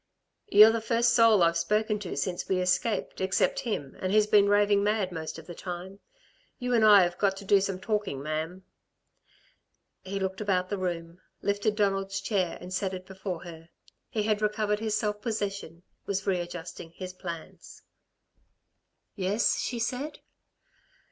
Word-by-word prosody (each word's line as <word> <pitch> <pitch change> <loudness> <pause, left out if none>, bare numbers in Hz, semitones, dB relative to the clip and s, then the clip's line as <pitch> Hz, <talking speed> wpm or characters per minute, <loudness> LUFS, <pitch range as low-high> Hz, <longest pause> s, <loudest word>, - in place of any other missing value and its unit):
"You're 210 +2 +8
the 230 0 -1
first 235 +1 +2
soul 225 -5 +6
I've 170 0 +3
spoken 210 +2 0
to 190 -4 -6
since 180 -2 -3
we 190 - +2
escaped 185 +3 0
except 190 0 +1
him, 145 - -4
and 185 - -1
he's 215 0 +4
been 205 -1 +4
raving 205 0 +4
mad 205 -2 0
most 160 -2 -5
of - - -11
the 175 - -8
time. 180 +3 -7 0.6
You 250 -2 -2
and 230 -2 +4
I've 190 -5 +6
got 195 -1 +1
to 200 - -9
do 195 0 +4
some 195 -1 -2
talking, 205 -8 -2
ma'am." 160 +5 -4 1.4
He 195 +1 -4
looked 190 +1 -3
about 185 -3 0
the 205 - -2
room, 170 -1 -4 0.2
lifted 205 +1 0
Donald's 195 -2 0
chair 195 -3 -1
and 180 +1 -8
set 190 0 -1
it 185 0 -9
before 190 -2 -6
her. 165 -1 -11 0.4
He 215 - -1
had 215 0 0
recovered 210 0 0
his 215 -1 0
self 210 -1 -2
possession, 200 -7 -4 0.2
was 195 -1 -2
readjusting 175 -3 -4
his 185 0 -7
plans. 170 -3 -9 1.3
"Yes?" 200 +3 +1
she 245 - -2
said. 255 +6 -3
195 Hz, 160 wpm, -28 LUFS, 180-210 Hz, 1.4 s, You're